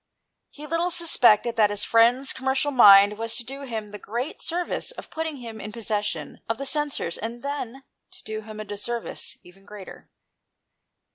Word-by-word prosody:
He 295 - -11
little 335 +3 0
suspected 250 - +3
that 210 -2 +5
his 205 0 -2
friend's 240 +4 +4
com 260 - -7
mercial 270 +2 +2
mind 205 -3 +8
was 230 0 -1
to 240 - -2
do 275 +4 -7
him 220 -4 -5
the 210 - -8
great 245 +8 -5
service 345 +1 -2
of - - -9
putting 320 -2 -3
him 230 -4 -8
in 210 - -6
possession 210 -2 -3
of 225 - 0
the 275 - -5
censers, 290 - -1
and 230 +2 -6
then 275 -2 -5 0.3
to - - -18
do 215 0 -5
him 215 0 -10
a 215 - -5
disservice 210 +3 -4
even 190 +2 -18
greater. 205 -1 -12
230 Hz, 180 wpm, -25 LUFS, 210-275 Hz, 0.3 s, mind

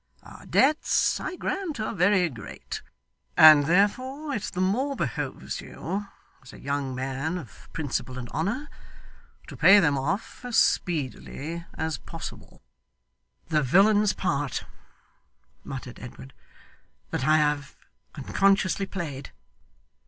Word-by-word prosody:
Our - - -13
debts, 295 +3 +3
I 380 - -4
grant, 365 -7 -3
are 215 - -2
very 180 -1 +3
great, 115 -9 -8 0.6
and 155 -2 +9
therefore 255 - +1
it 215 - -2
the 180 - -5
more 245 +10 +1
behoves - - -4
you, 200 +1 -5 0.3
as 130 - -14
a - - -13
young 140 -2 -2
man 135 +6 -2
of 135 - -11
principle 130 -4 -3
and 125 -1 -5
honour, 205 - -2 0.8
to - - -10
pay 205 +1 +7
them 145 -7 +2
off 190 - -3
as 245 -2 -1
speedily 165 +1 0
as 160 0 -2
possible.' 165 -1 -9 0.9
'The 155 -2 +3
villain's 205 - +4
part,' 145 -7 -2 1.0
muttered 130 -2 -7
Edward, 130 +2 -10 0.8
'that 130 - -1
I 155 0 +6
have 150 -2 0 0.4
unconsciously 195 +5 +1
played! 145 -9 -6
165 Hz, 120 wpm, -26 LUFS, 140-205 Hz, 1.0 s, and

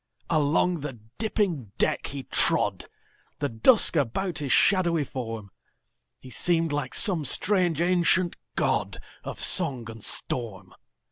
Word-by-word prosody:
Along 160 +3 +1
the 135 -5 -7 0.2
dipping 180 - -2
deck - - +1
he 140 -1 -6
trod, - - +1 0.5
The 145 - -3
dusk 170 - +3
about 160 +5 -1
his 140 -3 -3
shadowy 175 -5 +3
form; 115 -7 -7 0.7
He 130 - -14
seemed 165 0 0
like 145 -1 -3
some 180 -8 +2
strange 175 +1 +1
ancient 175 0 +2 0.2
godOf - - -3
song 130 - +3
and 110 -2 -11
storm. 95 -7 -1
150 Hz, 120 wpm, -25 LUFS, 125-180 Hz, 0.7 s, dusk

